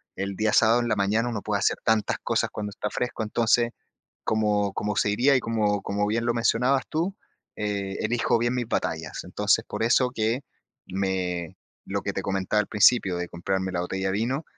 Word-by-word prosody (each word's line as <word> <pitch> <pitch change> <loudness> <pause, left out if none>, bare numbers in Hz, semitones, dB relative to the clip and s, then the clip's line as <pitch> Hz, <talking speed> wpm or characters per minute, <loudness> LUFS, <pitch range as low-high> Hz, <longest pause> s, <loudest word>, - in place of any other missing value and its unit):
el 100 0 -3
día 110 -1 +1
sábado 115 +1 +5
en 120 - -1
la 105 - +1
mañana 105 +4 +1
uno 110 -4 -3
puede 105 -1 -1
hacer - - +1
tantas 110 -1 +1
cosas - - +1
cuando 105 -1 -5
está 105 +1 -4
fresco. 120 -2 -3
Entonces, 120 +2 +2 0.5
como 105 -2 +1
como 105 -1 -2
se 105 - +2
diría 130 +7 +3
y - - +4
como 105 -3 0
como 105 +1 -1
bien 115 +2 0
lo 120 - +2
mencionabas 125 +3 +2
tú, 170 +5 -1 0.4
eh, 100 -2 -2
elijo 115 +1 +1
bien 120 +2 0
mis 120 -2 -2
batallas. 80 -7 -2
Entonces, - - +1
por - - -3
eso 125 +2 +3
que 115 +3 0 0.5
me 90 -3 -2 0.3
lo - - -2
que - - -2
te - - -2
comentaba 95 +2 0
al - - -6
principio 105 -3 +4
de 90 0 -3
comprarme 95 +2 -2
la 90 -1 -1
botella 95 +2 -2
de - - 0
vino, 125 +8 -1
105 Hz, 200 wpm, -26 LUFS, 100-120 Hz, 0.5 s, sábado